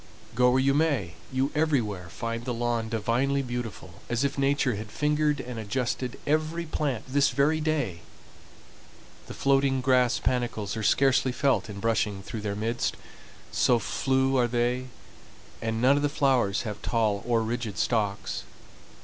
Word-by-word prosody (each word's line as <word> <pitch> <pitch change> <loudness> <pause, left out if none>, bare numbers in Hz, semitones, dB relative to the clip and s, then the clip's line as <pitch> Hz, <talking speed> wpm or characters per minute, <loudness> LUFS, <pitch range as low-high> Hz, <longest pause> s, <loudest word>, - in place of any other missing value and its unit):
Go 125 +2 +4
where 130 +1 +3
you 135 +1 +3
may, 140 - +1 0.2
you 130 +2 0
everywhere 120 - 0
find 115 +6 -4
the 125 -1 -3
lawn 115 -1 -1
divinely 120 +5 0
beautiful, 120 -4 -6
as 120 +2 0
if 140 0 0
Nature 140 -2 +1
had 105 +1 -6
fingered 150 0 +1
and 125 -3 -6
adjusted 125 +3 -2
every 155 +3 0
plant 140 -7 -2
this 140 +1 +3
very 155 +3 +2
day. 145 - -1 1.3
The - - -8
floating 135 -1 +2
grass 130 -2 +3
panicles 120 -5 -1
are 110 - -3
scarcely 130 +3 +3
felt 125 -7 +1
in 100 -1 -7
brushing 105 -2 0
through 110 +3 -6
their 100 -1 -3
midst, 115 +3 -1 0.5
so 125 - +3
flue 130 +5 +1
are 120 -1 +3
they, 120 +2 0 0.7
and 110 0 -1
none 130 +4 +5
of - - 0
the 145 - +1
flowers 130 -9 +2
have 105 -3 -5
tall 110 -4 0
or 115 -2 +1
rigid 115 -3 -3
stalks. 105 -4 -1
125 Hz, 155 wpm, -27 LUFS, 110-140 Hz, 1.3 s, none